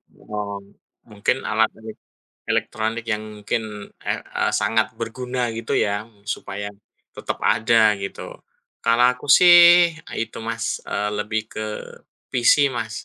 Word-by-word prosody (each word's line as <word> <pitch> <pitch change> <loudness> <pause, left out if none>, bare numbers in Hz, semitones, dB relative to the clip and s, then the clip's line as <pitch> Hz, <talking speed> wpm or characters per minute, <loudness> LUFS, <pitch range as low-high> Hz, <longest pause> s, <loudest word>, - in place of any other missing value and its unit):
Oh, 100 -1 -6 0.4
mungkin 105 +4 -2
alat 110 +1 +2
elik 110 -1 -10 0.5
elektronik 110 +1 -1
yang 105 -1 -1 0.2
mungkin, 105 -1 -4 0.2
eh, - - -2
e - - -4
sangat 110 0 0
berguna, 125 +1 -3
gitu 115 0 -2
ya, 105 0 0
mmm, 105 -3 -28
supaya 100 0 -5 0.4
tetap - - -4
ada, 110 -1 +4
gitu. 100 - -7 0.5
Kalau 115 +1 +3
aku 125 +3 -12
sih, 175 +1 +8 0.2
itu, 115 0 -4
Mas. 115 +1 -3
Eee, 105 +1 -1
lebih 105 +1 -2
ke 110 - -4 0.7
PC, 130 +3 +4
Mas. 115 -2 -5
110 Hz, 130 wpm, -22 LUFS, 105-120 Hz, 0.7 s, sih